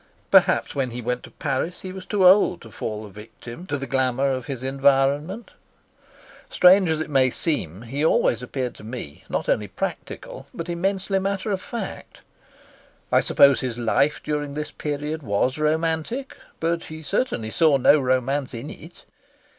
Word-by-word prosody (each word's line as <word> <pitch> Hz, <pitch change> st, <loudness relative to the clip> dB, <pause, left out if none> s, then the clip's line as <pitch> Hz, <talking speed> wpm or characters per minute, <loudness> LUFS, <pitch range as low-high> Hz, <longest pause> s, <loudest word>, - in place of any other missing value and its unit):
Perhaps -, -, +4 dB
when 135 Hz, -2 st, -1 dB
he 120 Hz, +1 st, -6 dB
went 125 Hz, +1 st, -2 dB
to -, -, -12 dB
Paris 145 Hz, +4 st, -3 dB
he 185 Hz, -, -6 dB
was 185 Hz, 0 st, -9 dB
too 200 Hz, -3 st, +2 dB
old 180 Hz, -1 st, +5 dB
to 115 Hz, -, -12 dB
fall 110 Hz, 0 st, -5 dB
a -, -, -10 dB
victim 115 Hz, -, -11 dB
to 145 Hz, -, -1 dB
the 135 Hz, -, -5 dB
glamour 135 Hz, 0 st, +1 dB
of 130 Hz, -2 st, -3 dB
his 130 Hz, -3 st, -5 dB
environment. 140 Hz, -, +1 dB, 1.0 s
Strange 185 Hz, 0 st, +6 dB
as 160 Hz, -1 st, 0 dB
it 160 Hz, -, -3 dB
may 130 Hz, -2 st, +4 dB
seem, 115 Hz, -, -2 dB
he 135 Hz, +6 st, -3 dB
always 120 Hz, -6 st, +3 dB
appeared 125 Hz, -1 st, -3 dB
to -, -, -14 dB
me 110 Hz, -, -8 dB
not -, -, -2 dB
only 105 Hz, -, +1 dB
practical, 95 Hz, -, -6 dB
but 165 Hz, -, -5 dB
immensely 195 Hz, +3 st, 0 dB
matter 195 Hz, +2 st, -2 dB
of 190 Hz, -2 st, -1 dB
fact. 230 Hz, -5 st, -7 dB, 0.9 s
I -, -, +5 dB
suppose 140 Hz, -1 st, +5 dB
his 125 Hz, -3 st, -3 dB
life 135 Hz, +5 st, +1 dB
during 145 Hz, -1 st, -3 dB
this 150 Hz, 0 st, -4 dB
period 150 Hz, +1 st, -4 dB
was 125 Hz, +4 st, 0 dB
romantic, 160 Hz, -, -1 dB, 0.2 s
but 165 Hz, +1 st, -1 dB
he 160 Hz, 0 st, -9 dB
certainly 150 Hz, -, -1 dB
saw 155 Hz, -1 st, +4 dB
no 145 Hz, +3 st, +5 dB
romance 130 Hz, +1 st, 0 dB
in 120 Hz, +6 st, -6 dB
it. 165 Hz, +3 st, -13 dB
145 Hz, 170 wpm, -23 LUFS, 125-170 Hz, 1.0 s, Strange